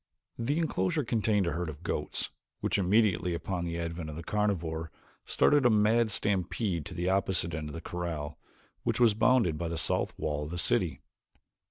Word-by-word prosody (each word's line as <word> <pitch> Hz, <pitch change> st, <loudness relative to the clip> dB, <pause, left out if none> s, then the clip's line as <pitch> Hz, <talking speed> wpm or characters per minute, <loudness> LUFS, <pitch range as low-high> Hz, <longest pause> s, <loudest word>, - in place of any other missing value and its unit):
The 140 Hz, +6 st, 0 dB
enclosure 165 Hz, -1 st, 0 dB
contained 110 Hz, -4 st, +1 dB
a 85 Hz, -, 0 dB
herd 85 Hz, -1 st, -2 dB
of 75 Hz, +2 st, -9 dB
goats -, -, -3 dB, 0.3 s
which -, -, 0 dB
immediately 95 Hz, -3 st, +2 dB
upon 85 Hz, +2 st, -3 dB
the 85 Hz, 0 st, -3 dB
advent 85 Hz, -1 st, -4 dB
of 75 Hz, -, -7 dB
the 85 Hz, -, -6 dB
carnivore 85 Hz, -6 st, -1 dB, 0.4 s
started 145 Hz, -1 st, +3 dB
a 125 Hz, -, +6 dB
mad 110 Hz, +1 st, +3 dB
stampede 95 Hz, -3 st, 0 dB
to 90 Hz, -, -9 dB
the 90 Hz, +1 st, -2 dB
opposite 95 Hz, -3 st, +2 dB
end 75 Hz, 0 st, -4 dB
of -, -, -8 dB
the 85 Hz, -, -6 dB
corral 80 Hz, -4 st, -4 dB, 0.4 s
which -, -, -1 dB
was 120 Hz, -3 st, +5 dB
bounded 110 Hz, -8 st, +3 dB
by 85 Hz, -, -2 dB
the 85 Hz, 0 st, -3 dB
south -, -, 0 dB
wall 75 Hz, -1 st, -2 dB
of -, -, -7 dB
the 85 Hz, -, -4 dB
city. 90 Hz, 0 st, +1 dB
90 Hz, 185 wpm, -30 LUFS, 85-110 Hz, 0.4 s, a